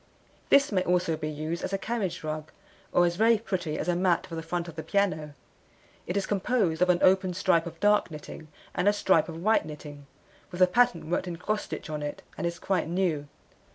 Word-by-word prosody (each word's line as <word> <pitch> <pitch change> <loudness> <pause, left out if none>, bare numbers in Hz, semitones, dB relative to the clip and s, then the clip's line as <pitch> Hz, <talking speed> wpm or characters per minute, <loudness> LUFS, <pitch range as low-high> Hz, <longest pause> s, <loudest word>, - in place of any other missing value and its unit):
This 280 -1 +5
may 190 -3 +2
also 180 -2 +1
be 155 0 -4
used 155 +3 -4
as - - -3
a - - +2
carriage 205 -5 -3
rug, 155 0 -4 0.4
or 175 - +4
is 175 0 -1
very 225 +2 +5
pretty 185 -7 -3
as - - -3
a 175 - +2
mat 175 -1 +2
for 175 - -12
the 165 - -3
front 170 +1 -3
of 170 - -9
the 160 - -4
piano. 155 -7 -1 0.7
It 180 - -1
is 200 - 0
composed 195 -5 0
of 180 - +4
an 180 - +5
open 185 -1 +4
stripe 170 -3 +2
of 165 0 -9
dark 210 -2 +3
knitting, 155 0 -9 0.3
and 180 - 0
a 205 - +6
stripe 190 -5 +2
of 165 +1 -7
white 220 +2 +3
knitting, 150 -2 -10 0.4
with 180 -1 -8
a - - +9
pattern 240 -4 +2
worked 180 - 0
in 175 - -4
cross 210 +5 -1
stitch - - -6
on 155 -1 -4
it, 145 0 -5
and 170 - -2
is 170 0 -4
quite 190 -4 -1
new. 170 -5 0
175 Hz, 225 wpm, -28 LUFS, 160-195 Hz, 0.7 s, a